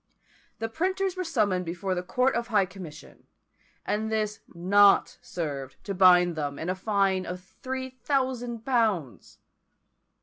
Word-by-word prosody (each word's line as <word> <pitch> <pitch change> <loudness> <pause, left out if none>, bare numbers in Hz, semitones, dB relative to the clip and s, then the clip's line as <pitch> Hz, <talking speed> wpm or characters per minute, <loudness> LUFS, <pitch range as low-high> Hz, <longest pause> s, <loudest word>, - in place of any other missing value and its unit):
The 225 +1 -2
printers 375 - -1
were 370 - -2
summoned 210 - +1
before 180 +3 -3
the 180 - -2
Court 250 +8 +1
of 235 0 -2
High 210 -4 +3
Commission, 185 -5 -12 0.6
and 220 +1 -1
this 215 -1 -1
not 195 +3 +4
served 140 -7 -5
to 200 - -4
bind 180 -2 +5
them 145 -2 -3
in 165 - -4
a 185 - 0
fine 195 -1 +1
of 180 0 -5 0.2
three 260 0 -4
thousand 250 -4 -1
pounds! 215 - 0
200 Hz, 140 wpm, -27 LUFS, 180-240 Hz, 0.6 s, bind